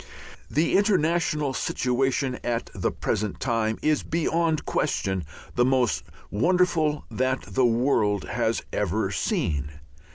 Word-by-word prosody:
The 155 +4 +1
international 165 -7 +2
situation 130 0 0
at 120 -1 -2
the - - -1
present 105 -1 -2
time 110 -1 0
is 155 -1 +2
beyond 165 -1 0
question 95 -2 -1 0.3
the 120 - +3
most 125 - +2 0.3
wonderful 165 - +2
that 130 +1 0
the 130 -2 +2
world 115 -4 +2
has - - -1
ever - - 0
seen. 75 -2 -1
130 Hz, 110 wpm, -25 LUFS, 115-155 Hz, 0.3 s, the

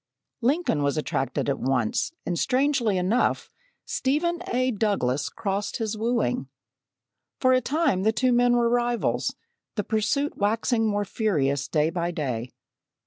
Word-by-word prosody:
Lincoln 265 - +1
was 140 +1 0
attracted 135 -3 -1
at 140 -1 0
once, 125 - 0
and 175 -1 -1
strangely 260 -6 +2
enough, 190 +7 +1 0.3
Stephen 340 +6 0
A. 255 +1 +1
Douglas 195 - 0
crossed 200 -2 -3
his 225 -2 -2
wooing. 220 - 0 0.9
For 255 -1 +4
a 255 - +4
time 285 - +1
the 215 +3 +3
two 255 +3 +1
men 245 0 +4
were 235 -1 +3
rivals, 240 0 0 0.4
the 210 - -1
pursuit 230 +8 0
waxing 225 +2 +1
more 205 -1 0
furious 150 - 0
day 155 0 +1
by 170 -1 -1
day. 130 -8 -3
215 Hz, 140 wpm, -25 LUFS, 165-245 Hz, 0.9 s, For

